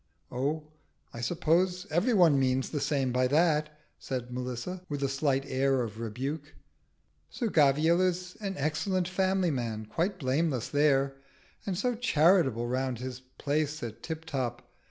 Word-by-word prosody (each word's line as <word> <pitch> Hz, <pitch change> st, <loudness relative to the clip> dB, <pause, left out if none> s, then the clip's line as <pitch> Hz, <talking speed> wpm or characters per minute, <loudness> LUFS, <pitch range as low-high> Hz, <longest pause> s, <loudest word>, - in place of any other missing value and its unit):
"Oh, 145 Hz, +5 st, -1 dB, 0.5 s
I 115 Hz, -, -6 dB
suppose 180 Hz, -, +1 dB
every 210 Hz, +9 st, +2 dB
one 165 Hz, -7 st, +5 dB
means 130 Hz, 0 st, +1 dB
the 150 Hz, -, -1 dB
same 135 Hz, -3 st, 0 dB
by 125 Hz, +1 st, +2 dB
that," 150 Hz, +1 st, +2 dB, 0.2 s
said 125 Hz, -2 st, -4 dB
Melissa, 125 Hz, +9 st, -4 dB
with 145 Hz, -1 st, -3 dB
a -, -, +2 dB
slight 135 Hz, 0 st, 0 dB
air 135 Hz, -1 st, +1 dB
of 110 Hz, -1 st, -6 dB
rebuke. 135 Hz, +7 st, -4 dB, 0.7 s
"Sir 235 Hz, -4 st, -2 dB
Gavial 155 Hz, +2 st, +4 dB
is 180 Hz, 0 st, -1 dB
an 195 Hz, -2 st, -3 dB
excellent 170 Hz, +5 st, 0 dB
family 185 Hz, -1 st, +1 dB
man 115 Hz, -5 st, -3 dB
quite 175 Hz, -, -1 dB
blameless 135 Hz, -3 st, 0 dB
there; 140 Hz, -2 st, +2 dB, 0.5 s
and 185 Hz, -3 st, -1 dB
so 245 Hz, +5 st, +1 dB
charitable 165 Hz, -, +3 dB
round 130 Hz, 0 st, -1 dB
his 125 Hz, +1 st, -6 dB, 0.2 s
place 150 Hz, 0 st, -1 dB
at 115 Hz, -2 st, -6 dB
Tiptop. 145 Hz, -7 st, -4 dB
145 Hz, 145 wpm, -29 LUFS, 130-175 Hz, 0.7 s, one